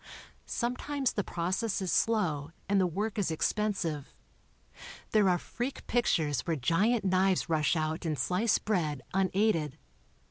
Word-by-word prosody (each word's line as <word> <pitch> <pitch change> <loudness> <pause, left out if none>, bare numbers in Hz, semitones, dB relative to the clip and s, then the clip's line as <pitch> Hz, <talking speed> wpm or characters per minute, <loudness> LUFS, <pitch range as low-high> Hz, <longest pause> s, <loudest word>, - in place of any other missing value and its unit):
Sometimes 255 +2 -1
the 205 - -1
process 185 +6 -1
is 185 -3 -2
slow 165 -10 +1 0.2
and 200 -1 +3
the 185 - +3
work 205 +5 -2
is 195 - +1
expensive. 165 -3 -1 1.0
There 210 -3 +4
are 180 - +3
freak 245 +9 -5
pic 240 0 +1
tures 145 -5 +1
where 165 - +1
giant 195 - +2
knives 185 -1 +2
rush 155 0 +2
out 155 +1 -1
and 155 -3 -1
slice 195 +9 +2
bread, 155 -10 -1
unaided. 190 -5 +1
185 Hz, 140 wpm, -30 LUFS, 160-215 Hz, 1.0 s, There